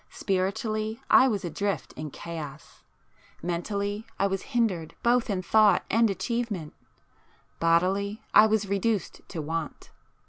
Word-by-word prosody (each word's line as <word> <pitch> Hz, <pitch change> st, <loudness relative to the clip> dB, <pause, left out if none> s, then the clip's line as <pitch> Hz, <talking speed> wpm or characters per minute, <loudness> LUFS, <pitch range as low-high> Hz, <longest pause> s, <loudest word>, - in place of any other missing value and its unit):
Spiritually 215 Hz, +3 st, -2 dB
I 260 Hz, -, +8 dB
was 205 Hz, -7 st, -1 dB
adrift 200 Hz, +4 st, -2 dB
in 155 Hz, 0 st, -6 dB
chaos,—mentally 170 Hz, +6 st, -6 dB
I -, -, +2 dB
was 195 Hz, -1 st, -1 dB, 0.2 s
hindered 185 Hz, -9 st, 0 dB
both 240 Hz, 0 st, +3 dB
in 190 Hz, -3 st, -1 dB
thought 210 Hz, 0 st, +4 dB
and 225 Hz, +1 st, +4 dB
achievement,—bodily, 195 Hz, -1 st, -2 dB
I 215 Hz, -, +8 dB
was 215 Hz, -2 st, +1 dB
reduced 200 Hz, +1 st, -1 dB
to 160 Hz, -5 st, -5 dB
want. 160 Hz, 0 st, -5 dB
200 Hz, 110 wpm, -27 LUFS, 170-215 Hz, 0.2 s, I